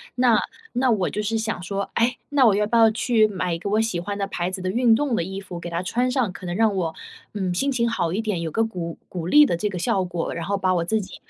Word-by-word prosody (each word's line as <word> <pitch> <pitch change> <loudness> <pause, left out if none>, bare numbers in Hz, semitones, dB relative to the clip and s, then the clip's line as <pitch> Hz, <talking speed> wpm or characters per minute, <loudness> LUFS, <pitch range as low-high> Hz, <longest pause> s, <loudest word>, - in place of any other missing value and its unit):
那 245 -3 +4 0.3
那 255 +1 +2
我 195 -5 +1
就 210 - -3
是 225 +2 -1
想 220 -5 -2
说： 195 +2 -3
“诶， 245 +2 +2
那 280 -3 +4
我 205 -3 +5
要 210 0 +2
不 235 +2 +1
要 225 -1 +7
去 220 -1 +3
买 185 -4 -2
一 165 - -3
个 200 - -4
我 215 +2 +2
喜 225 -6 -1
欢 200 +3 -4
的 200 - -1
牌 175 -2 -2
子 190 0 -5
的 185 - -2
运 235 0 +4
动 265 -3 0
的 170 - 0
衣 195 +1 -6
服 175 -3 -8
给 175 - -6
它 170 +2 -3
穿 245 +7 0
上， 250 -7 0
可 185 - -10
能 175 0 -3
让 220 -1 +3
我， 170 -4 -2 0.4
嗯， 190 -3 -2
心 275 +10 0
情 235 -2 +1
好 170 -6 -1
一 215 - 0
点， 210 -6 -2
有 165 - -2
个 225 - +1
鼓 175 -6 -5
鼓 175 -2 -5
励 295 +8 +7
的 170 - 0
这 210 - -1
个 190 -3 -4
效 185 +2 0
果， 175 -2 -3
然 165 0 -4
后 200 +1 0
把 185 -1 +1
我 170 -1 0
自 220 +3 +1
己， 190 - -10
200 Hz, 315 characters per minute, -23 LUFS, 180-225 Hz, 0.4 s, 要